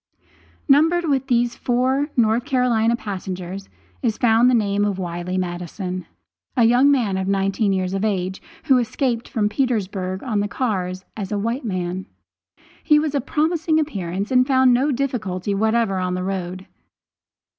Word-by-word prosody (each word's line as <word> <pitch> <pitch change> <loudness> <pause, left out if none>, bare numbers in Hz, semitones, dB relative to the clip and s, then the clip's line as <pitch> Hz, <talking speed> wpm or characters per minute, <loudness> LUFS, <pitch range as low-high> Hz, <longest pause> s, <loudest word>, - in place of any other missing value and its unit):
Numbered 325 +5 +4
with 270 -2 0
these 240 -2 +1
four 260 +4 0
North 230 0 +3
Carolina 235 -3 +2
passengers 190 -3 -6 0.3
is 225 -4 0
found 235 +1 +4
the 250 - +4
name 205 -2 +1
of 205 -2 0
Wiley 175 0 -4
Maddison, 180 0 -4 0.5
a 240 - +5
young 245 +5 +5
man 210 -9 +1
nineteen 195 +1 +1
years 185 -1 -1
of 195 +1 -1
age, 190 -3 -1 0.2
who 265 -4 +4
escaped 240 0 -1
from 210 -2 0
Petersburg 205 -6 -2
on 220 -5 -1
the 205 - 0
cars 185 -6 -2
as 200 -2 -5
a 205 - 0
white 230 +6 -2
man. 185 -1 -3 0.8
He 300 - +5
was 300 -1 0
of 280 -2 -2
promising 320 0 +1
appearance, 200 - -3
and 255 0 +4
found 260 -2 +4
no 270 +5 +2
difficulty 210 -8 -2
whatever 220 -1 +1
on 180 0 -1
the 180 - -3
road. 185 -1 -4
220 Hz, 155 wpm, -21 LUFS, 190-255 Hz, 0.8 s, a